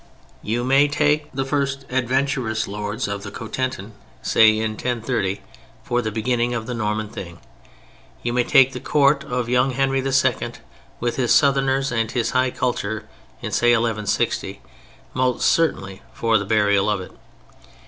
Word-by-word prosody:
You 115 +3 -2
may 135 +3 +4
take 150 +1 +1
the 135 0 -2
first 140 -1 -1
adventurous 130 -3 0
lords 105 +4 -3
of 100 0 -4
the 100 - -7
Cotentin 115 0 -4
in, 110 - -13 0.3
say 110 -1 +5
1030, 110 -3 -2 0.4
for 120 0 0
the 110 - -2
beginning 120 +2 0
of 115 -1 -3
the 125 - -4
Norman 110 -1 -2
thing; 85 -4 -9 0.9
you 120 - -1
may 125 0 +2
take 135 +2 +5
the 125 - -5
Court 140 +1 +2
of 125 -3 -3
young 125 +2 +2
Henry 135 +1 0
II. 130 -3 +1 0.5
with 120 0 -2
his 125 -3 +3
Southerners 135 -1 +2
and 115 -2 0
his 115 -2 -1
high 130 0 +2
culture 110 -4 -3 0.4
in, - - -4
say 120 0 +3
1160, 110 -3 -1 0.5
most 130 -1 0
certainly 100 - +1
for 115 -2 +2
the 100 - -4
burial 105 -1 +2
of 105 -2 0
it. 95 - -9
120 Hz, 155 wpm, -22 LUFS, 110-135 Hz, 0.9 s, say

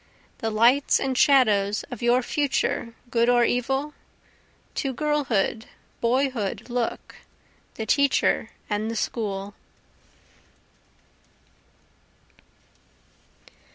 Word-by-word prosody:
The 225 - -2
lights 235 +6 +3
and 265 -1 -1
shadows 215 -8 +3
of 245 - -7
your 240 +1 +3
future, 270 -5 -1 0.2
good 235 0 +2
or 240 -1 +4
evil? 270 +5 -1 0.8
To 270 -2 -2
girlhood, 255 -6 -1 0.3
boyhood 240 -3 -1
look, 240 -1 -3 0.6
the 220 - -4
teacher 280 +5 +2 0.2
and 210 +1 -2
the 230 - -4
school. 205 -3 -3
240 Hz, 85 wpm, -24 LUFS, 220-270 Hz, 0.8 s, or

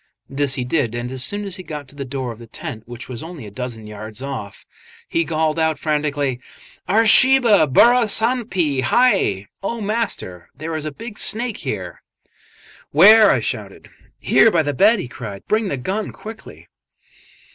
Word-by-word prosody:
This 135 -1 -1
he 125 - -2
did, 125 -4 -1
and 120 +1 -4
as 130 -1 -3
soon 205 +5 -2
as 195 -2 -5
he - - -7
got 150 -5 -8
to - - -13
the 140 - -5
door 130 -2 -4
of 115 - -11
the 115 - -12
tent, 110 0 -8
which 120 0 -9
was 120 -3 -6
only 165 -7 -9
a 105 - -10
dozen 115 -1 -6
yards 105 +1 -8
off, 130 -7 -7 0.4
he 165 - 0
called 160 0 -1
out 160 -1 +1
frantically, 145 -4 -1 0.5
"Are, 220 +4 +4
Sahib, 265 +4 +6 0.3
burra 240 - +5
sanp 235 +3 +1 0.3
hai!" 120 - +2 0.2
("Oh, 230 +4 -3
Master, 205 - -3
there 155 +4 -6
is 155 -1 -4
a 155 - -3
big 225 +7 -9
snake 230 0 0
here!) 95 - -6 0.9
"Where?" 210 +7 +7
I - - +2
shouted. - - -5 0.3
"Here 225 - +4
by 170 -6 +2
the 145 -1 -2
bed," 210 +7 +4
he 185 - -5
cried, 105 -5 -9
"Bring 215 0 +1
the 140 - -2
gun, 195 +11 -3
quickly." 220 +1 -11
150 Hz, 180 wpm, -20 LUFS, -, 0.9 s, Where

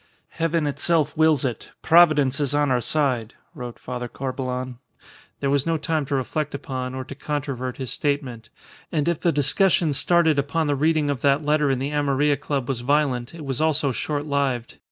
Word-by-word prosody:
"Heaven 165 -1 -1
itself 155 +1 0
wills 155 -3 +3
it. 120 -4 -4
Providence 155 -5 +5
is 145 -1 0
on 145 -2 +2
our 125 -1 +2
side," 130 -6 -1 0.2
wrote 120 -1 -7
Father 125 -1 -5
Corbelan; 130 -1 -4 0.6
there 140 - 0
was 140 +1 +1
no 165 -1 +1
time 155 -2 -1
to 140 - -1
reflect 145 +3 -2
upon 130 -2 -5
or 130 - -4
to 135 - -9
controvert 135 -3 -4
his 130 -4 -5
statement; 130 -6 -2 0.4
and 150 -2 0
if 170 -3 +1
the 170 - +2
discussion 160 +2 +3
started 160 0 +3
upon 145 +4 0
the 145 -1 +1
reading 155 0 +2
of 140 - -4
that 140 +1 +2
letter 150 -1 +2
in 135 - +1
the 135 +3 -3
Amarilla 145 0 +1
Club 140 -3 -3
was 135 -4 -2
violent, 130 0 0
it 160 -3 -8
was 135 +1 -2
also 150 -3 +2
shortlived. 140 -3 -2
140 Hz, 180 wpm, -23 LUFS, 130-155 Hz, 0.6 s, Providence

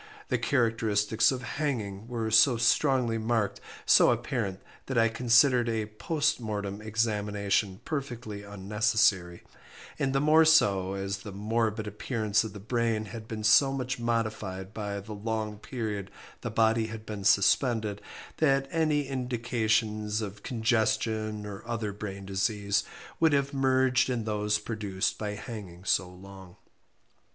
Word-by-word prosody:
The - - +1
characteristics 115 -3 +2
of 130 -1 -4
hanging 115 -8 -3
were 115 -2 -3
so 115 +3 +6
strongly 120 0 +2
marked, 110 -2 -1 0.2
so - - +6
apparent, 95 -1 -1 0.3
that 130 - -2
I 115 0 +4
considered 120 +1 +4
a 110 -2 -1
post 145 +9 -1
mortem 105 -3 -4
examination 105 -2 -1
perfectly 120 -8 -5
unnecessary, 100 -2 0 0.6
and 135 -1 +1
the 135 - +1
more 155 +3 +5
so 100 -12 +3
as 100 0 -3
the 105 - -9
morbid 110 +2 -1
appearances 105 0 -1
of 110 - -7
the 105 - -8
brain 115 0 -1
had 110 -1 -8
been 110 -1 -5
so 135 +5 +5
much 130 -2 -3
modified 110 -5 -2
by 105 -2 -4
the 105 +2 -8
long 105 0 -3
period 105 -5 -4 0.3
the - - -3
body 110 0 +2
had 110 -1 -8
been 105 -2 -6
suspended, 105 +1 +2 0.4
that 135 -3 +2
any 155 -4 +1
indications 115 -4 -1
of 105 -1 -6
congestion, 110 -2 0
or 100 0 -7
other 110 -3 -3
brain 100 -1 -7
disease, 100 +1 0 0.4
would 160 -2 +4
have 140 -1 +1
been 140 - -4
merged 130 -1 +3
in 120 -3 -1
those 105 -1 0
produced 105 -4 -3
by 105 -1 -3
hanging 100 -6 -8
so 90 -1 +1
long. 95 0 -13
110 Hz, 140 wpm, -28 LUFS, 105-120 Hz, 0.6 s, so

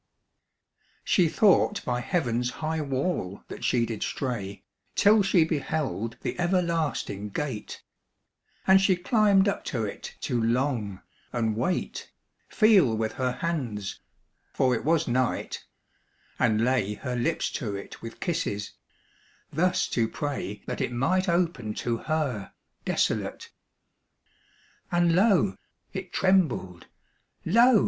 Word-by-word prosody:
She 175 -4 +3
thought 205 +2 +3
by 125 -1 0
heaven's 125 -5 0
high 160 +4 -3
wall 135 - -2
that - - -8
she 120 -2 +2
did 115 -2 -5
stray 105 -7 -3 0.3
Till 210 +1 +6
she 190 -4 +4
beheld 140 - -2
the - - -3
everlasting 170 - 0
gate: 125 -1 -5 0.8
And 190 0 +6
she 195 -1 +4
climbed 200 +1 +3
up 200 - -1
to 115 -4 -1
it 100 - -7
to 120 -2 0
long, 115 -5 0 0.3
and 115 -3 0
wait, 130 +11 -2 0.4
Feel 195 - +5
with 110 0 -1
her 130 -1 0
hands 125 - -3 0.5
(for 130 -1 +2
it 115 - -1
was 165 +1 +2
night), 125 0 -1 0.8
and 110 +1 +3
lay 115 -5 +1
Her 125 +3 -4
lips 125 +7 0
to 105 -7 -3
it 100 - -8
with 115 0 -8
kisses; 155 - -2 0.8
thus 180 +4 +2
to 115 -2 +1
pray 130 -7 -4
That - - -4
it - - -1
might 180 +10 +1
open 170 -11 0
to 120 -1 -1
her 140 -7 -2 0.3
desolate. - - -1 1.4
And 175 -1 +3
lo! 195 -1 +3 0.4
it 190 -2 -5
trembled, 160 - +1 0.6
lo! 235 +5 +6
135 Hz, 125 wpm, -27 LUFS, 115-175 Hz, 1.4 s, Till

